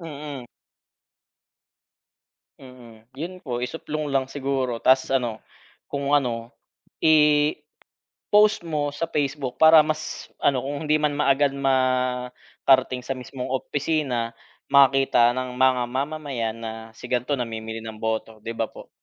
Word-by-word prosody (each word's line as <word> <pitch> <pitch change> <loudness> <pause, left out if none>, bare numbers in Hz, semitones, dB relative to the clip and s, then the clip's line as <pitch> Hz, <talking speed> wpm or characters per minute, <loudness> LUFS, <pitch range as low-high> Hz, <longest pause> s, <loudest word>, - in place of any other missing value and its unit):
Mm. 145 -5 -7 2.1
Mm, 120 -4 -15
'yon 165 +7 -5
po, 120 -2 -3
isuplong 150 +2 -4
lang 135 -1 +1
siguro. 135 -3 -2
Tas, 130 0 +4
ano 120 -4 0 0.5
kung 140 0 -2
ano, 120 -4 -2 0.5
i-post 150 -1 +3 0.8
mo 150 -3 -1
sa 165 - -2
Facebook, 140 -3 -2
para 160 -1 +8
mas 155 0 -4
ano 130 -3 +1
kung 145 +3 -4
hindi 155 +1 +3
man 150 -1 +1
maagad 140 -1 +3
makarating 130 -1 +1
sa 135 +2 -3
mismong 125 +1 -7
opisina, 135 -3 -1 0.4
makita 135 -3 +5
ng 130 -1 -4
mga 130 -1 +4
mamamayan 135 -4 -3
na 110 -1 -5 0.2
si 125 - -10
gan'to 125 +3 0
namimili 115 -3 -4
ng 110 -1 -8
boto, 110 0 -3
'di 115 - -4
ba 115 -1 -2
po? - - -13
130 Hz, 125 wpm, -24 LUFS, 125-145 Hz, 2.1 s, para